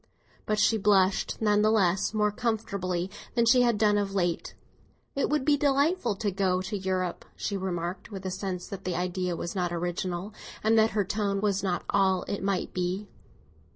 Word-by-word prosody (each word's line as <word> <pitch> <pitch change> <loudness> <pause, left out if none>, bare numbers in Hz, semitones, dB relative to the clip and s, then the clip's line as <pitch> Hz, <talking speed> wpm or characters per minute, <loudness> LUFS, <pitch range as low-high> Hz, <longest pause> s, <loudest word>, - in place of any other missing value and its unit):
But 215 - +1
she 215 +1 +3
blushed, 195 -1 +2
none 210 -1 +4
the 215 - +4
less, 195 -4 +2
more 210 -1 +1
comfortably 200 -6 -2 0.2
than 235 -1 +3
she 250 +2 +6
had 235 -3 +3
done 210 -1 +3
of 200 -1 -2
late. 175 -3 -1 0.6
"It 280 - 0
would 300 -2 +1
be 295 -1 +4
delightful 280 - +2
to 205 +1 -1
go 185 -1 +1
to 190 +3 -4
Europe," 185 -2 -2
she 205 - -3
remarked, 180 -1 -3
with 195 -3 -8
a 185 - -2
sense 185 -1 -4
that 195 -1 -7
the 180 -2 -2
idea 180 0 -1
was 170 - -4
not 180 -3 -1
original, 175 +3 -3 0.3
and 220 +1 +4
that 220 0 +5
her 205 - +2
tone 200 0 -1
was 200 -1 +1
not 180 -3 -1
all 190 -2 +2
it 200 - -4
might 195 -1 -1
be. 185 +3 -2
195 Hz, 190 wpm, -28 LUFS, 185-215 Hz, 0.6 s, she